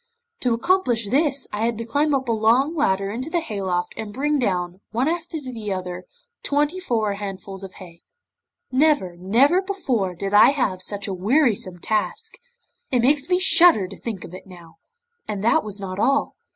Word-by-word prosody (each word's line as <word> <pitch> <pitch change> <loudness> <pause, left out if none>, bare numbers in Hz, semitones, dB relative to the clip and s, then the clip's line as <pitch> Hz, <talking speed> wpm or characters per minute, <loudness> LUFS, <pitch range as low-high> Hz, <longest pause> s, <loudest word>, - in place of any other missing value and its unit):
To 245 -2 +1
accomplish 240 - +1
this 280 -1 +1
I 210 - -3
had 230 -1 0
to 230 - -5
climb 285 +5 +1
up 265 -1 -2
a - - +1
long 235 +8 +2
ladder 195 -9 +1
into 255 +7 -4
the 345 - +1
hayloft, 190 - -3
and 220 -2 -6
bring 290 +5 0
down, 180 -5 -1
one 240 +5 0
after 335 0 -2
another, 200 -7 -5 0.4
twenty 295 +5 0
four 225 - -1
handfuls 195 -1 -7
of 190 - -9
hay. 175 -3 -13 0.7
Never, 260 - +2
never 240 - +3
before, 260 - -2
did 195 +3 -4
I 210 +4 +8
have 195 -10 -1
such 200 +2 -3
a 195 - -3
wearisome 205 - +1
task! 220 - -2 0.5
It 250 -3 +1
makes 285 +4 +2
me 360 - +4
shudder 350 - +5
to 195 - -9
think 220 -6 -6
of 175 - -11
it 185 - -11
now, 175 -3 -14 0.5
and 205 -2 -4
that 230 - +3
was 210 -1 -5
not 190 -1 -5
all. 275 +5 +1
225 Hz, 180 wpm, -22 LUFS, 195-285 Hz, 0.7 s, I